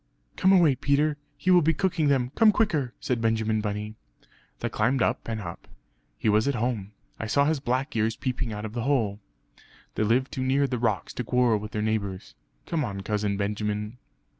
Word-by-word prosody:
"Come 190 - +4
away, 175 -7 +6
Peter; 145 +3 +1 0.2
he 185 - +1
will 180 -1 +7
be 160 0 +2
cooking 170 -3 +1
them; 130 -3 +2
come 220 -2 +6
quicker!" 160 - 0
said 125 -3 -1
Benjamin 110 -1 +1
Bunny. 105 0 -3 0.7
They - - -1
climbed 125 +4 +1
up - - -1
and 110 -1 -3
up; 85 -4 -8 0.5
"He - - -2
was 110 +4 +3
at 140 - +1
home; 110 -4 -2 0.3
I 115 - -3
saw 140 +5 +3
his 155 0 +1
black 130 +2 -2
ears 110 0 +1
peeping 125 -3 -3
out 105 0 -5
of 110 - -6
the 120 - -2
hole." 115 -6 0 0.7
"They - - -2
live 120 +5 +2
too 130 - -4
near 135 +2 +2
the 125 -3 -2
rocks 120 - -1
to 125 - -3
quarrel 125 -3 +2
with 105 +1 -7
their 105 0 -2
neighbours. 100 -4 -2 0.3
Come 165 -3 -1
on, 100 -5 -4
Cousin 105 0 -1
Benjamin!" 105 +2 -2
120 Hz, 195 wpm, -26 LUFS, 105-140 Hz, 0.7 s, will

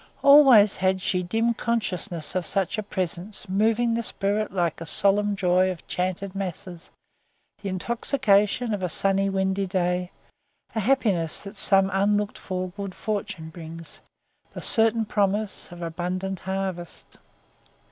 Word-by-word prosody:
Always 270 -8 +7
had 190 0 +1
she 185 -1 0
dim 225 +6 0
consciousness 185 -9 -2
of 185 0 0
such 195 +2 -1
a - - 0
presence 190 +1 -4
moving 225 +5 +2
the 230 - 0
spirit 210 -1 -1
like 175 -4 0
the 165 - -7
solemn 205 +3 +2
joy 185 -1 +2
of 180 -3 -7
chanted 185 +1 -2
masses, 185 -2 -5 0.7
the 200 - -4
intoxication 220 +2 +1
of 205 - -2
a 180 - -1
sunny 195 +3 +1
windy 190 0 0
day, 180 -1 0 0.6
the 220 - -1
happiness 205 - +1
that 200 0 -8
some 195 -1 +3
unlooked 205 +1 +1
for 185 -1 -4
good 195 0 -7
fortune 195 -6 -4
brings, 165 -1 -10 0.5
the - - -7
certain 225 0 +2
promise 205 -1 -1
of 175 0 -8
abundant 180 +3 -3
harvest 190 -2 -5
195 Hz, 135 wpm, -25 LUFS, 180-210 Hz, 0.7 s, Always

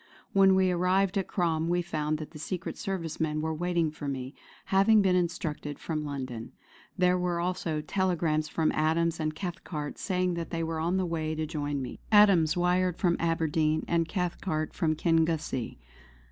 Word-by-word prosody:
When 195 -1 +6
we 190 -1 +3
arrived 185 +2 +2
at 190 - -3
Crom 165 -3 0
we 175 0 +1
found 155 -2 -1
that 155 -1 -8
the 155 - -10
Secret 170 +3 -4
Service 180 -5 -4
men 155 -1 0
were 160 +1 -1
waiting 170 -1 0
for 150 -1 -7
me, 130 -1 -4 0.3
having 200 +2 +4
been 185 -1 +3
instructed 165 -4 -2
from 155 -2 -3
London. 130 -5 -5 0.4
There 180 0 +3
were 175 -1 0
also 170 -3 -1
telegrams 160 -3 0
from 160 0 +1
Adams 160 +2 +1
and 155 -1 -2
Cathcart 170 -4 -5
saying 180 -1 0
that 170 -1 -4
they 165 -1 -2
were 160 0 -2
on 170 +4 0
the 190 - +1
way 160 -2 -2
to 155 0 -2
join 145 -3 -3
me. 125 - -7
Adams 190 -6 +6
wired 180 0 +2
from 175 -3 +2
Aberdeen, 160 -2 +1
and 165 -1 +1
Cathcart 175 -4 -2
from 160 -3 0
Kingussie. 160 -6 0
165 Hz, 175 wpm, -29 LUFS, 155-180 Hz, 0.4 s, When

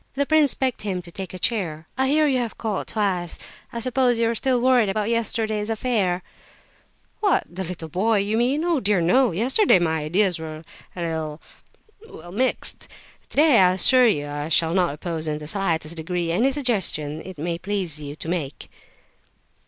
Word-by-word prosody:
The 280 +1 +1
prince 310 -1 +4
begged 260 -2 -1
him 195 -4 -2
to 170 - -9
take 190 +1 -7
a 185 - -7
chair. 170 -6 -2
"I 265 +1 +1
hear 305 +3 +3
you 265 -3 +2
have 235 -3 -4
called 215 -4 -3
twice; 190 -5 -1 0.3
I 235 - -4
suppose 250 0 +2
you 230 0 +2
are - - -1
still 255 +2 +1
worried 245 -4 +3
about 210 +2 -1
yesterday's 220 -2 0
affair." 210 -6 0 1.0
"What, 405 -4 +2
about 185 +1 -6
that 165 - -7
boy, 210 +7 +1
you 200 +2 0
mean? 255 +7 +1
Oh 340 -4 +1
dear 205 -4 +2
no, 220 +9 +3
yesterday 245 - +3
my 160 -2 0
ideas 180 +2 +1
were 155 0 -7 0.3
a - - -8
little—well—mixed. 175 - -4 0.4
Today, 295 -4 +5
I 180 -1 +5
assure 250 +6 +5
you, 145 -10 +1
I 145 +1 -5
shall 165 0 +2
not 180 -3 +2
oppose 160 0 -4
in 150 -1 -1
the 150 - -9
slightest 165 -2 -1
degree 170 +1 -2
any 235 +11 +2
suggestions 190 - -1
it 185 -2 -10
may 170 +3 -3
please 185 -6 -2
you 145 0 -7
to 160 - -8
make." 165 -6 -4
195 Hz, 175 wpm, -23 LUFS, 165-245 Hz, 1.0 s, Today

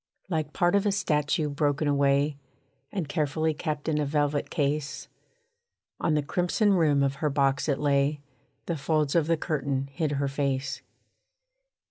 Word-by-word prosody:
Like 155 -4 -1
part 175 +2 +2
of 200 +1 +2
a - - +3
statue 155 -5 +1
broken 145 +1 0
away, 140 +1 +2 0.6
And 185 -7 -3
carefully 155 +1 0
kept 155 -1 -4
in 155 -2 +1
a 150 - +1
velvet 145 0 0
case, 145 0 -2 0.9
On 155 - +1
the 150 - +1
crimson 180 +7 +1
rim 150 -6 +3
of 140 0 0
her 150 - 0
box 140 +1 +1
it 140 - +2
lay; 145 0 +1 0.5
The 170 - -2
folds 150 0 0
of 165 -3 +2
the 165 0 +2
curtain 140 -4 -2
hid 155 -1 -1
her 140 0 0
face. 135 0 -2
150 Hz, 155 wpm, -27 LUFS, 140-160 Hz, 0.9 s, a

